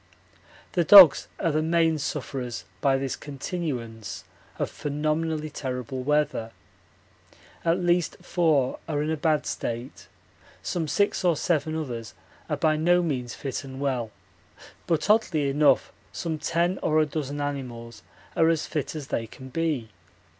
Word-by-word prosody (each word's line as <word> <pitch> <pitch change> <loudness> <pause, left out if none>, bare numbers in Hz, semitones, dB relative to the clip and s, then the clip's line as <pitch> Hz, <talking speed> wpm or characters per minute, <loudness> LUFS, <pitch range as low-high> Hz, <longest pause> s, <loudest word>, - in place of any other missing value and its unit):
The 175 - +2
dogs 180 -3 +9
are 165 - +1
the 155 +1 +1
main 165 -1 +2
sufferers 130 -4 -4 0.2
by 135 -2 +3
this 135 -2 -2
continuance 135 - -5 0.3
of - - -2
phenomenally 155 +1 -2
terrible 130 -2 -4
weather. 150 -5 0 1.1
At 165 +1 +2
least 175 -1 +1
four 155 -7 +1
are 150 -1 0
in 155 - -1
a - - +1
bad 155 -1 +1
state; 120 +2 -5 0.6
some 165 -3 -2
six 200 +6 +1
or 175 -2 +3
seven 155 0 0
others 120 -8 -5 0.3
are - - 0
by 155 -1 +2
no 175 +3 +3
means 125 -7 -2
fit 135 0 -4
and 135 -1 -9
well, 130 -5 -1 0.8
but 160 -1 +1
oddly 190 -9 +3
enough 145 +1 +3 0.2
some 160 -2 -3
ten 170 +4 0
or 155 0 +2
a 155 - +4
dozen 145 -1 -4
animals 120 -6 -5 0.3
are 165 0 +4
as 165 -2 +1
fit 150 0 -3
as 150 -3 -6
they 115 - -2
can 130 +4 -11
be. 150 -6 -1
150 Hz, 145 wpm, -26 LUFS, 130-165 Hz, 1.1 s, dogs